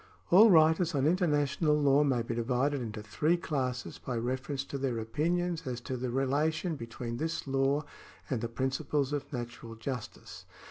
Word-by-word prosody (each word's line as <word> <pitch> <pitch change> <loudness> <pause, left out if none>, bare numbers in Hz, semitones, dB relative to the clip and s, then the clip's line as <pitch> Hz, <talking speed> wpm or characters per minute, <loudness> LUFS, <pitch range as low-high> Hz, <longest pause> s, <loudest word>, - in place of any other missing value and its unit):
All 210 +6 +8
writers 160 -1 +4
on 135 -1 +2
international 150 -3 +2
law 145 0 +4
may 130 -5 +1
be 115 - -3
divided 125 +4 0
into 110 -2 -5
three 155 +11 +1
classes 130 -7 -3
by 125 -2 -4
reference 130 +3 -2
to 140 0 -6
their 130 -3 -1
opinions 165 +8 -1
as 125 -2 -3
to 130 - -4
the 125 0 -3
relation 150 +6 0
between 115 -1 -6
this 160 +3 -2
law 135 +2 +1 0.4
and 125 -5 -2
the 115 - -3
principles 135 +3 -1
of 145 - -3
natural 120 -3 -6
justice. 125 +1 -7
135 Hz, 165 wpm, -30 LUFS, 125-155 Hz, 0.4 s, All